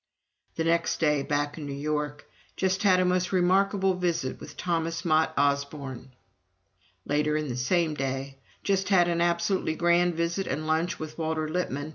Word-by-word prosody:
The 165 - -1
next 165 +1 +1
day, 150 -3 +2
back 145 +2 -2
in 145 - -6
New 140 - -4
York: 150 0 -3 0.3
"Just 190 0 0
had 185 -3 +4
a 185 - +3
most 180 0 +1
remarkable 190 +1 +3
visit 175 -7 -2
with - - -11
Thomas 165 0 -2
Mott 160 -1 +3
Osborne." 140 -2 -1 1.0
Later 150 +1 +1
in 155 -2 -3
the 120 - -3
same 155 +6 +1
day: 135 -1 -4 0.2
"Just 195 -1 0
had 180 -3 +5
an 170 -1 0
absolutely 170 0 +1
grand 175 +1 +3
visit 170 +3 -1
and 150 +4 -2
lunch 160 +3 0
with 155 +1 -7
Walter 160 -1 -1
Lippmann 155 -3 -2
160 Hz, 165 wpm, -27 LUFS, 145-175 Hz, 1.0 s, had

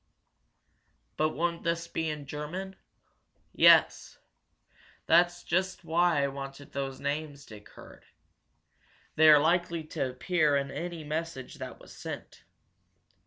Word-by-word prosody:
"But 155 0 +1
won't 170 +1 -2
this 170 0 -1
be 160 -1 -2
in 150 -2 -5
German?" 160 +7 -6 0.8
"Yes. - - +5 0.9
That's 175 +1 +3
just 185 0 -1
why 170 -2 +2
I - - +2
wanted 135 +1 -8
those 135 -1 -4
names 145 -1 -4
Dick 105 -1 -13
heard. - - -15 1.1
They 155 0 +6
are 150 - +9
likely 170 +2 +1
to 135 -3 -3
appear 150 +3 +1
in 140 -1 -3
any 170 0 -5
message 155 -3 -5
that - - -7
was - - -14
sent. - - -9
155 Hz, 120 wpm, -29 LUFS, 140-170 Hz, 1.1 s, are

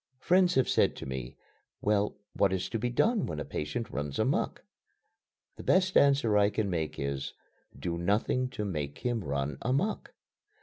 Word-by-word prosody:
Friends 180 +5 +3
have 130 - +3
said - - +3
to - - -7
me: 65 -1 -5 0.4
"Well, 105 0 +1 0.2
what 100 -2 +3
is 95 0 -1
to 115 - -2
be 120 - 0
done 215 - +2
when 80 -2 -4
a - - -4
patient 75 +10 -4
runs 70 -1 -3
amuck?" - - 0 0.9
The - - -8
best 185 0 +3
answer 140 -6 +4
I 100 0 +4
can 105 -2 -1
make 80 -3 -2
is: 70 -1 -3 0.4
"Do 85 -1 -3
nothing 105 +7 +1
to 105 -4 -4
make 75 -7 -3
him 120 -4 0
run 70 -1 -2
amuck." 140 - -1
105 Hz, 170 wpm, -30 LUFS, -, 0.9 s, answer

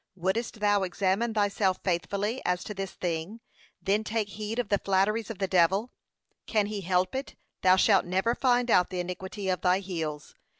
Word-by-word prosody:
Wouldest 200 +5 -2
thou 205 -1 +3
examine 195 +5 0
thyself 200 -2 +1
faithfully 200 +6 -1
as 180 0 0
to 210 - -6
this 195 -1 -5
thing, 175 +5 -3 0.4
then 205 +2 +1
take 215 -1 -2
heed 215 +2 -5
of 245 -4 -1
the 200 - +2
flatteries 200 +3 +1
of 225 - -5
the 195 - -1
devil: 190 +6 +2 0.6
can 215 -3 +2
he 205 -1 -4
help 185 0 +1
it, 265 +1 -4 0.3
thou 185 0 +6
shalt 195 0 +4
never 190 +6 +1
find 245 -1 +2
out 180 - +4
the 180 - -4
iniquity 190 +3 -5
of 185 -1 0
thy 180 0 +3
heels. 160 -6 -5
195 Hz, 180 wpm, -28 LUFS, 185-215 Hz, 0.6 s, thou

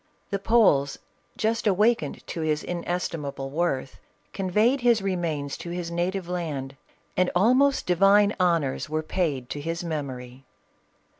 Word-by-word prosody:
The 200 - 0
Poles 195 -11 +3 0.4
just 225 0 0
awakened 215 +4 +1
to 165 - -5
his 155 -1 0
inestimable 165 -6 -3
worth, 140 -5 -2 0.3
conveyed 210 +8 +2
his 235 -4 +3
remains 165 -7 -2
to 170 - -7
his 175 -1 -4
native 175 +2 -2
land, 150 -7 -4 0.4
and 185 0 +2
almost 255 +9 +3
divina 200 +3 +4
honors 165 -6 +1
were 155 +1 -1
paid 150 -7 -1
to 145 - -4
his 165 +3 -3
memory. 135 -5 -5
175 Hz, 130 wpm, -25 LUFS, 145-195 Hz, 0.4 s, divina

